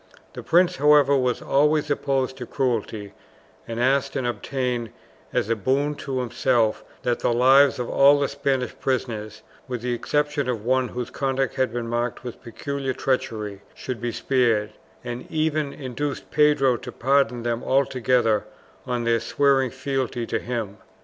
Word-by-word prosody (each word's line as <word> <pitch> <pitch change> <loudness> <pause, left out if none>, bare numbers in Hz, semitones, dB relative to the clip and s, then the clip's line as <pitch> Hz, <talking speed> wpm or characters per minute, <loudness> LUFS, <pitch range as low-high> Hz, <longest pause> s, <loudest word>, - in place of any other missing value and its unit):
The - - -7
prince, 175 -1 +3
however, 145 0 +5
was 125 -2 0
always 150 +1 +2
opposed 135 -2 0
to 125 -3 -7
cruelty, 110 -6 -2 0.5
and 115 0 -4
asked 135 +2 +1
and 130 -3 -1
obtained 120 0 -2 0.4
as - - 0
a 115 - +1
boon 135 +7 0
to 130 -2 -3
himself 120 -2 +1 0.2
that 120 -1 0
the - - +1
lives 135 +4 +5
of 125 -2 -3
all 140 +1 +5
the 140 - +1
Spanish 135 -2 -1
prisoners, 110 -5 -3 0.2
with 125 -2 -4
the 125 0 -1
exception 145 +2 -1
of 115 -4 -3
one 130 0 +2
whose 125 -1 -5
conduct 135 -1 -1
had 130 -3 0
been 120 -1 -3
marked 120 0 -2
with 125 -2 -8
peculiar 135 +3 -4
treachery, 110 -7 -2
should 125 -3 -6
be 120 0 -2
spared, 115 -5 +1 0.3
and 120 0 -6
even 155 -2 0
induced 140 +1 -5
Pedro 140 -4 +4
to 125 +2 -8
pardon 125 -2 +1
them 120 0 -2
altogether 125 -5 +2 0.4
on 125 -1 -1
their 115 0 +2
swearing 135 +3 +2
fealty 130 -2 -3
to - - -2
him. 115 -5 -4
130 Hz, 155 wpm, -24 LUFS, 120-140 Hz, 0.5 s, however